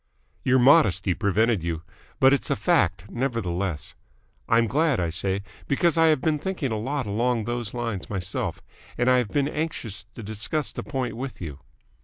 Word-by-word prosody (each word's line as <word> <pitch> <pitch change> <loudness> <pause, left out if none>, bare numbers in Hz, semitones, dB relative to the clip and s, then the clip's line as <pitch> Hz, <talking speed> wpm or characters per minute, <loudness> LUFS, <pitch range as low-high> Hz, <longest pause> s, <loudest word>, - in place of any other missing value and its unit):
"Your 130 0 +4
modesty 105 - +5
prevented 105 0 +1
you. 85 -1 -3 0.4
But 135 +1 +6
it's 140 - 0
a 140 - +2
fact, 95 - +1
nevertheless. 100 - -2 0.6
I'm 115 0 +4
glad, 145 +3 +2
I 85 -2 0
say, 95 +3 0 0.2
because 170 +4 +2
I 165 0 +5
have 155 -4 +3
been 155 -2 +1
thinking 170 -7 -2
a 110 - -1
lot 135 +3 -2
along 115 +3 0
those 120 -1 -3
lines 115 -5 -3
myself, 95 -3 -2 0.3
and 120 +1 +3
I 125 - +5
have 120 -5 -2
been 140 -1 +1
anxious 115 - -4
to 115 - -8
discuss 110 +8 -2
the - - -5
point 130 -6 -3
with 130 +2 -6
you. 75 -6 -7
120 Hz, 175 wpm, -25 LUFS, 100-140 Hz, 0.6 s, But